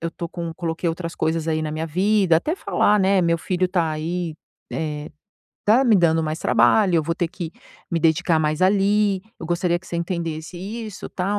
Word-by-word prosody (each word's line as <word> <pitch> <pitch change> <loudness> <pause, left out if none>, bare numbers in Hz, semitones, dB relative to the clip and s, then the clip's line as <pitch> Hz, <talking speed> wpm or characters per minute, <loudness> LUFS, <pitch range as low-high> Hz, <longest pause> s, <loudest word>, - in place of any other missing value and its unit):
eu 165 - -2
estou 170 +1 -6
com 170 0 -5
coloquei 170 0 -3
outras 165 0 -4
coisas, 160 0 -1
aí, 155 0 0
na 155 - -3
minha 160 +1 -3
vida", 190 +1 +3
até 300 - -1
falar, 210 - +2
né: 190 -1 +3
"Meu 170 0 +2
filho 185 +2 -1
está 175 -3 0
aí, 165 +1 -3 0.4
eh, 150 -1 -3 0.5
está 235 +6 +4
me 230 -3 +5
dando 165 -3 +3
mais 155 +1 -3
trabalho, 175 - +4
eu 160 - +3
vou 165 +2 -1
ter 175 -1 -1
que 170 -1 -6 0.4
me 170 - -1
dedicar 160 +1 +3
mais 155 +2 0
ali, 200 0 +3 0.2
eu 165 - -7
gostaria 175 0 +1
que 185 - -19
você - - -7
entendesse 170 -1 -3
isso, 215 +1 -6
tal, 195 +3 -1
170 Hz, 200 wpm, -22 LUFS, 160-190 Hz, 0.5 s, me